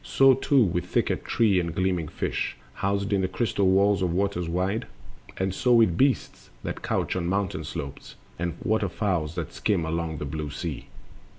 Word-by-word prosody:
So 135 Hz, 0 st, +5 dB
too 135 Hz, 0 st, +3 dB
with 90 Hz, -3 st, -1 dB
thicket, -, -, 0 dB
tree, 105 Hz, -5 st, +3 dB
and 85 Hz, -2 st, -3 dB
gleaming 90 Hz, -4 st, 0 dB
fish -, -, -3 dB, 0.2 s
Housed 100 Hz, +1 st, -1 dB
in 100 Hz, -, +2 dB
the 95 Hz, -, +1 dB
crystal 100 Hz, 0 st, 0 dB
walls 100 Hz, +1 st, +4 dB
of 90 Hz, -2 st, +1 dB
waters 90 Hz, -2 st, -1 dB
wide; 95 Hz, +7 st, -1 dB, 0.5 s
And 95 Hz, 0 st, -1 dB
so 125 Hz, +5 st, +2 dB
with 110 Hz, -7 st, +5 dB
beasts 135 Hz, +4 st, 0 dB
that -, -, -4 dB
couch -, -, -1 dB
on 90 Hz, -2 st, -1 dB
mountain 100 Hz, +1 st, -1 dB
slopes, 70 Hz, 0 st, -7 dB, 0.2 s
And 85 Hz, 0 st, -2 dB
water 110 Hz, -4 st, +1 dB
fowls 90 Hz, -6 st, -1 dB
that 85 Hz, -3 st, -4 dB
skim 100 Hz, -6 st, 0 dB
the 80 Hz, -, -3 dB
long 85 Hz, -1 st, -2 dB
blue 75 Hz, +1 st, -4 dB
sea. 75 Hz, +1 st, -5 dB
95 Hz, 180 wpm, -26 LUFS, 85-100 Hz, 0.5 s, So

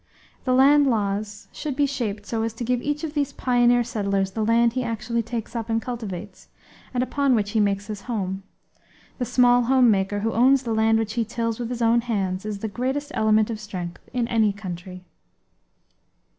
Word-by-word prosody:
The 255 Hz, -, +2 dB
land 280 Hz, +2 st, +6 dB
laws 210 Hz, -2 st, -1 dB
should 295 Hz, -3 st, -4 dB
be 290 Hz, +1 st, +3 dB
shaped 220 Hz, -7 st, -3 dB
so 225 Hz, 0 st, -2 dB
as 225 Hz, 0 st, -2 dB
to 225 Hz, -, -6 dB
give 245 Hz, +1 st, 0 dB
each 295 Hz, +3 st, -2 dB
of 310 Hz, -2 st, -4 dB
these 285 Hz, -2 st, 0 dB
pioneer 245 Hz, -2 st, +3 dB
settlers 200 Hz, -4 st, -1 dB
the 220 Hz, +2 st, -2 dB
land 230 Hz, +1 st, +3 dB
he 255 Hz, 0 st, -1 dB
actually 235 Hz, 0 st, -2 dB
takes 230 Hz, 0 st, -5 dB
up 230 Hz, -1 st, -3 dB
and 225 Hz, 0 st, +1 dB
cultivates, 210 Hz, -5 st, -7 dB, 0.4 s
and 250 Hz, -1 st, 0 dB
upon 275 Hz, 0 st, +1 dB
which 205 Hz, -2 st, 0 dB
he 220 Hz, -, +1 dB
makes 200 Hz, -1 st, +1 dB
his 210 Hz, -2 st, -6 dB
home. 195 Hz, -4 st, -3 dB, 0.8 s
The 250 Hz, -, 0 dB
small 245 Hz, 0 st, +4 dB
homemaker, 210 Hz, -6 st, +3 dB
who 225 Hz, +1 st, -1 dB
owns 260 Hz, +3 st, +4 dB
the 230 Hz, -2 st, -2 dB
land 220 Hz, 0 st, +3 dB
which 220 Hz, -1 st, -2 dB
he 235 Hz, 0 st, 0 dB
tills 230 Hz, 0 st, -3 dB
with 235 Hz, -1 st, -3 dB
his 240 Hz, -1 st, -2 dB
own 230 Hz, +1 st, +4 dB
hands, 195 Hz, -4 st, -2 dB
is 210 Hz, -1 st, -3 dB
the 220 Hz, -, -4 dB
greatest 265 Hz, +7 st, -3 dB
element 215 Hz, 0 st, +2 dB
of 220 Hz, -, -4 dB
strength 180 Hz, -5 st, -6 dB
in 245 Hz, -2 st, -1 dB
any 220 Hz, -3 st, +2 dB
country. 185 Hz, -2 st, -8 dB
225 Hz, 195 wpm, -24 LUFS, 205-245 Hz, 0.8 s, land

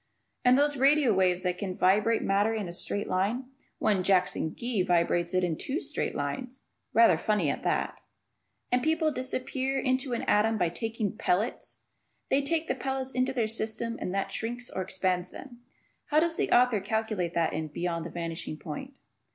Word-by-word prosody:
And 250 Hz, +1 st, +6 dB
those 290 Hz, 0 st, +3 dB
radio 275 Hz, -2 st, +4 dB
waves 185 Hz, -1 st, +2 dB
that 180 Hz, -1 st, -1 dB
can 190 Hz, -3 st, -4 dB
vibrate 210 Hz, +5 st, +3 dB
matter 205 Hz, +3 st, +2 dB
in 210 Hz, -4 st, -3 dB
a 170 Hz, -, -6 dB
straight 200 Hz, +3 st, -2 dB
line! 230 Hz, +8 st, -1 dB, 0.3 s
One 200 Hz, -3 st, +2 dB
Jackson 180 Hz, -4 st, +1 dB
Gee 235 Hz, -4 st, -1 dB
vibrates 175 Hz, -1 st, +1 dB
it 185 Hz, -, +2 dB
in 170 Hz, -3 st, 0 dB
two 275 Hz, -, -3 dB
straight -, -, -2 dB
lines. 255 Hz, 0 st, -4 dB, 0.3 s
(Rather 230 Hz, 0 st, +5 dB
funny 205 Hz, -9 st, +1 dB
at -, -, -5 dB
that.) -, -, -1 dB, 0.7 s
And 250 Hz, 0 st, +3 dB
people 315 Hz, +2 st, +2 dB
disappear 260 Hz, 0 st, -2 dB
into 260 Hz, 0 st, 0 dB
an 235 Hz, -, -2 dB
atom 220 Hz, +2 st, +3 dB
by 175 Hz, -4 st, +1 dB
taking 220 Hz, +3 st, -3 dB
pellets! 200 Hz, +7 st, -1 dB, 0.5 s
They 275 Hz, -, +4 dB
take 320 Hz, +3 st, +1 dB
the -, -, +1 dB
pellets 265 Hz, 0 st, -3 dB
into 255 Hz, 0 st, +1 dB
their 245 Hz, -4 st, 0 dB
system 225 Hz, +1 st, -2 dB
and -, -, -2 dB
that 195 Hz, -, -1 dB
shrinks 240 Hz, +2 st, -4 dB
or 190 Hz, -, -3 dB
expands 185 Hz, -1 st, -1 dB
them. 245 Hz, -3 st, -11 dB, 0.5 s
How 305 Hz, -, +4 dB
does 330 Hz, 0 st, +1 dB
the -, -, 0 dB
author 245 Hz, -3 st, +5 dB
calculate 215 Hz, -4 st, -2 dB
that 165 Hz, -1 st, +1 dB
in 155 Hz, 0 st, -2 dB
"Beyond 170 Hz, +2 st, -3 dB
The 170 Hz, -, -6 dB
Vanishing 165 Hz, -2 st, -5 dB
Point"? 190 Hz, -, -7 dB
220 Hz, 180 wpm, -28 LUFS, 180-255 Hz, 0.7 s, And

